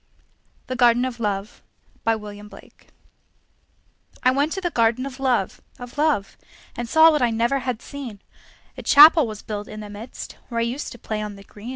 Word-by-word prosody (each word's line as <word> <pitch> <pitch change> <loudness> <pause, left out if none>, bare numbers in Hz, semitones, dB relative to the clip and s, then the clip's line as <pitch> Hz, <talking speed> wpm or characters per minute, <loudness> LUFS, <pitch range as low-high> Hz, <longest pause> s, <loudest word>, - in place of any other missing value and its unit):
THE 255 - -4
GARDEN 245 0 +4
OF 250 -2 -5
LOVE 205 -1 -3 0.5
I 225 - +4
went 210 0 -10 2.0
to 385 - -3
the 350 -2 -2
Garden 235 0 +1
of 270 -1 -8
Love, 250 -8 0 0.2
And 245 -3 -3
saw 320 +3 +7
what 300 - 0
I 245 - +3
never 235 +4 +1
had 250 -3 -4
seen; 255 -8 -8 0.6
A - - -8
Chapel 300 -1 +7
was 215 -2 -8
built 205 -1 -5
in 215 - -8
the 210 -1 -9
midst, 215 +4 -9
Where 235 -1 -2
I - - +2
used 245 +5 -4
to - - -12
play 215 -2 -4
on 210 -1 -5
the 200 - -13
green. 210 +4 -11
235 Hz, 170 wpm, -23 LUFS, 210-265 Hz, 2.0 s, saw